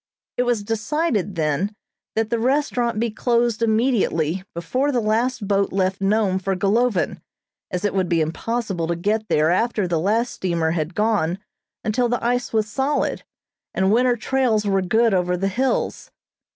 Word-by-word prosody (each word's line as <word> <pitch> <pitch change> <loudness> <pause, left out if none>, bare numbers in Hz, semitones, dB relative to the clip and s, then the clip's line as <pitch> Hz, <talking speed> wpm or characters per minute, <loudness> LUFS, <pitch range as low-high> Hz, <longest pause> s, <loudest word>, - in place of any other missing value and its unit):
It 250 - +1
was 230 -4 0
decided, 225 - -1
then, 165 +6 -1 0.4
that 225 0 0
the 235 - +1
restaurant 245 -3 0
be 230 0 0
closed 235 0 +1
immediately 220 - +1
before 255 - 0
the 250 - +1
last 225 +1 0
boat 200 0 +1
left 190 0 0
Nome 195 -1 +2
for 195 +1 -1
Golovin, 205 +3 +1 0.5
as 180 +3 -3
it 205 - 0
would 190 -2 0
be 170 -2 +2
impossible 180 +2 -2
to 170 - 0
get 210 +5 -1
there 155 0 +3
after 210 0 +1
the 170 -2 0
last 220 +8 +1
steamer 170 -3 -1
had 160 +1 -2
gone 210 -6 +1 0.5
until 240 +3 +1
the 245 - -1
ice 245 +1 0
was 220 -1 +1
solid, 270 +6 -1 0.5
and 190 +1 +2
winter 245 +2 +3
trails 230 -3 +1
were 195 -1 +2
good 220 +4 +2
over 180 -1 +1
the 195 +2 0
hills. 255 +6 -1
215 Hz, 165 wpm, -22 LUFS, 185-235 Hz, 0.5 s, there